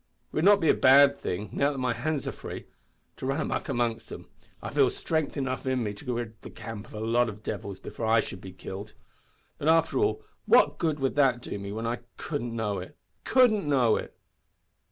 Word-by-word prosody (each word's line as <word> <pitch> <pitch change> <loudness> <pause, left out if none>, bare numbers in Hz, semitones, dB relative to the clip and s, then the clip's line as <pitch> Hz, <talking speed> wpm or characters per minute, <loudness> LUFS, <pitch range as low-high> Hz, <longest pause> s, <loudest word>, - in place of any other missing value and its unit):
It - - -12
would 155 - +2
not 205 0 +7
be 165 - +1
a - - +7
bad 140 +2 +6
thing, 95 -2 -4
now 140 +1 +2
that 140 - -6
my 125 -2 0
hands 145 +4 -2
are - - -1
free, - - -8 0.5
to 130 - -4
run 135 +3 0
a - - 0
muck - - -3
amongst 115 -1 -1
'em. - - -8 0.3
I - - -6
feel - - +4
strength 155 -2 -2
enough 130 -1 -2
in 130 -2 +1
me 105 -2 -2
to 125 +5 -5
rid 115 -2 -5
the - - -9
camp 110 -2 -8
of - - -12
a - - -5
lot 115 +2 +2
of 105 0 -10
devils 100 -2 -5
before 115 - -5
I 115 +1 +5
should 95 - -4
be 95 - -9
killed! 95 +3 -8 0.7
But, 145 - -2
after 165 0 +3
all, 420 +1 +1 0.2
what - - +5
good 155 -3 0
would 135 -1 0
that 130 -4 +4
do 100 - -5
me 100 0 -6
when 110 +2 -4
I 120 +1 -1 0.2
couldn't 120 -7 -4
know 105 -4 -1
it 90 - -10 0.3
couldn't 220 - +4
know 125 -6 +4
it! - - -6
120 Hz, 225 wpm, -28 LUFS, 110-145 Hz, 0.7 s, not